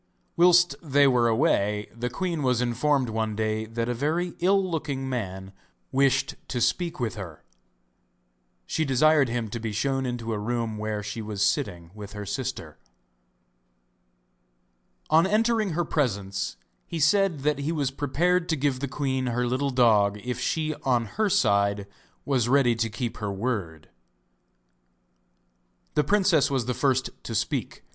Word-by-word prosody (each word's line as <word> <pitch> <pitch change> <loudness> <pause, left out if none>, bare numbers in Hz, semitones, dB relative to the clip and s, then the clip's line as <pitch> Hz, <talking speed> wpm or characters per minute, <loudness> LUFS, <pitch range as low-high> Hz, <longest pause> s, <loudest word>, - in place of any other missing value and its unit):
Whilst 175 0 +5
they 145 -3 +3
were 125 -3 +3
away 105 -5 +1
the 120 +1 -3
queen 170 +3 -3
was 125 -3 +2
informed 125 +3 +1
one 110 -1 -2
day 110 0 -1
that 115 +1 -3
a 120 - 0
very 160 +8 -1
ill 195 +2 +3
looking 140 -6 -3
man 95 -6 -4 0.4
wished 135 0 +2
to 125 - -3
speak 170 +6 0
with 120 -3 -1
her. 95 -8 -9 1.2
She 160 - -1
desired 145 0 +3
him 120 -1 -2
to 120 - -5
be 110 -1 -4
shown 135 +4 -1
into 115 -2 -3
a 105 - -2
room 115 0 -2
where 105 -1 -3
she 105 +3 -5
was 105 -2 -1
sitting 90 -4 -2
with 105 -1 -9
her 105 -1 -6
sister. 100 - -5 2.3
On 165 +3 +5
entering 215 -2 +1
her 175 +2 0
presence 100 -11 -2 0.3
he 165 - -4
said 175 0 +3
that 150 0 0
he 145 +3 -2
was 145 -5 -1
prepared 170 +6 0
to 160 - +2
give 140 -2 0
the 140 - -2
queen 130 -1 -2
her 125 +1 0
little 130 +3 0
dog 110 -6 +3
if 125 -1 -3
she 155 -1 -1
on 120 -3 +2
her 215 - -1
side 100 - +2 0.4
was 125 -4 +1
ready 130 -3 +4
to 115 0 -1
keep 115 +2 -4
her 105 -2 -3
word. 95 -7 -3 2.1
The 150 - +2
princess 185 -3 +3
was 135 -4 0
the 125 - -1
first 130 0 +1
to 115 - -6
speak. 115 - -2
125 Hz, 155 wpm, -26 LUFS, 110-150 Hz, 2.3 s, Whilst